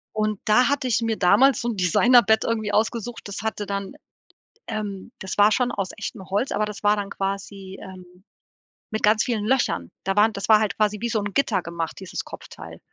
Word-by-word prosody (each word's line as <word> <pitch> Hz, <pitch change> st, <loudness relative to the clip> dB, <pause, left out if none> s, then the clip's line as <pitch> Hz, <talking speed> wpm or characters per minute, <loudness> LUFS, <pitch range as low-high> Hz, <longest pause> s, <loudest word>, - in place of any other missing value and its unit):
Und 215 Hz, -1 st, -1 dB
da 245 Hz, +4 st, +4 dB
hatte 285 Hz, -2 st, 0 dB
ich 230 Hz, -2 st, +1 dB
mir 225 Hz, -1 st, -1 dB
damals 210 Hz, +9 st, +4 dB
so 240 Hz, -, -2 dB
'n 225 Hz, -, -4 dB
Designerbett 220 Hz, +5 st, +4 dB
irgendwie 220 Hz, -2 st, -1 dB
ausgesucht, 230 Hz, +2 st, -1 dB
das 200 Hz, -1 st, -6 dB
hatte 220 Hz, -1 st, -3 dB
dann, 200 Hz, +1 st, -4 dB, 0.7 s
ähm 205 Hz, -1 st, -5 dB
das 190 Hz, 0 st, -6 dB
war 205 Hz, +1 st, +6 dB
schon 245 Hz, +2 st, +1 dB
aus 195 Hz, -2 st, -3 dB
echtem 215 Hz, -2 st, -6 dB
Holz, 205 Hz, +7 st, 0 dB
aber 215 Hz, -, 0 dB
das 210 Hz, 0 st, -8 dB
war 205 Hz, 0 st, +4 dB
dann 200 Hz, -1 st, -4 dB
quasi, 195 Hz, -1 st, -5 dB
ähm, 185 Hz, -1 st, -13 dB, 0.7 s
mit 220 Hz, -, -3 dB
ganz 215 Hz, +1 st, +4 dB
vielen 225 Hz, -4 st, -2 dB
Löchern. 215 Hz, -, 0 dB
Da 195 Hz, 0 st, -1 dB
waren 215 Hz, +2 st, +4 dB
das 200 Hz, +1 st, -5 dB
war 215 Hz, -1 st, +7 dB
halt 210 Hz, -4 st, -1 dB
quasi 210 Hz, -1 st, +1 dB
wie 235 Hz, -, -1 dB
so 220 Hz, -, 0 dB
'n 205 Hz, -1 st, -4 dB
Gitter 220 Hz, -7 st, +1 dB
gemacht, 170 Hz, -1 st, -5 dB
dieses 190 Hz, -2 st, -5 dB
Kopfteil. -, -, -11 dB
210 Hz, 205 wpm, -23 LUFS, 195-225 Hz, 0.7 s, war